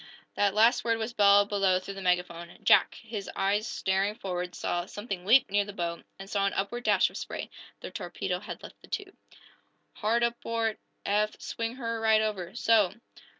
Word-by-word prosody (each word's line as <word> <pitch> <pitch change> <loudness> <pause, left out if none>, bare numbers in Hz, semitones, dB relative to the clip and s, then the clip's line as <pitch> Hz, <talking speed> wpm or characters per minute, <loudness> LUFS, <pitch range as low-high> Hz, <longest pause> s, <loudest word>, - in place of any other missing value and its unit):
That 200 -1 +1
last 225 +3 +5
word 230 -1 +1
was 225 +1 -4
bellowed 205 -2 +5
below 195 -3 +3
through 185 +2 -6
the 195 - -8
megaphone. 180 -2 -1
Jack, - - +5
his 215 -3 -6
eyes 205 +3 +1
staring 195 +2 0
forward, 180 -3 -4
saw 175 0 -2
something 200 -4 -6
leap 245 -1 +5
near 205 0 +3
the 205 0 -8
bow, 170 -3 -3 0.2
and 195 - -9
saw 200 0 +1
an - - -2
upward 240 +5 -3
dash - - +4
of - - -8
spray. - - -6 0.3
The - - -7
torpedo - - -3
had - - -8
left - - -12
the - - -15
tube. 395 -1 -5 0.8
"Hard 230 +2 +1
aport, 230 -2 -1 0.3
Eph! 210 +1 +1
Swing 230 +1 -4
her 230 -3 -3
right 220 -1 +5
over. 205 -5 -3
So!" 215 -5 +3
205 Hz, 185 wpm, -29 LUFS, 195-225 Hz, 0.8 s, last